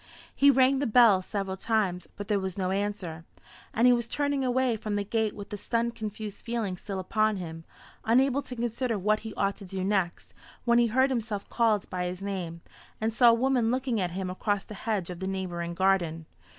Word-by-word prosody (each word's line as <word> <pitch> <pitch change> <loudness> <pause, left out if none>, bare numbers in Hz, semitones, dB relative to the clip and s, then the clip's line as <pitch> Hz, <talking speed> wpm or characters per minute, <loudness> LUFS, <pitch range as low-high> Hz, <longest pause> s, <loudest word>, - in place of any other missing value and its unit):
He 280 - +5
rang 265 0 +4
the 280 - 0
bell 220 -4 +6
several 195 0 -3
times, 190 -5 0
but 205 0 -7
there 205 -2 +1
was 190 -1 -4
no 185 -1 0
answer; 195 -5 -3 0.5
and 230 - +2
he 250 - +7
was 235 -1 0
turning 285 0 0
away 255 -1 +2
from 210 -1 -3
the 205 - 0
gate 220 +1 -1
with 205 -1 -9
the 205 - -3
stunned 230 +3 -1
confused 215 -2 -6
feeling 230 -5 -2
still 195 +2 -6
upon 215 +3 +1
him, 165 -2 -7 0.4
unable 265 +4 +3
to 255 - -8
consider 235 0 -1
what 210 +3 +1
he 220 - -7
ought 195 0 0
to 200 - -10
do 190 0 -4
next, 190 -3 -1 0.3
when 235 0 +5
he 240 - +4
heard 260 +4 +3
himself 220 -5 -3
called 220 -4 +2
by 180 -1 -2
his 180 +2 -5
name, 180 -4 -4 0.4
and 220 +1 -1
saw 240 +1 +6
a - - +6
woman 250 -1 +2
looking 250 -3 0
at 180 - 0
him 185 +1 -4
across 205 +1 -1
the - - -10
hedge 200 -4 -2
of 175 - -7
the 190 - -3
neighbouring 175 -3 -3
garden. 175 -4 +1
210 Hz, 210 wpm, -28 LUFS, 190-235 Hz, 0.5 s, he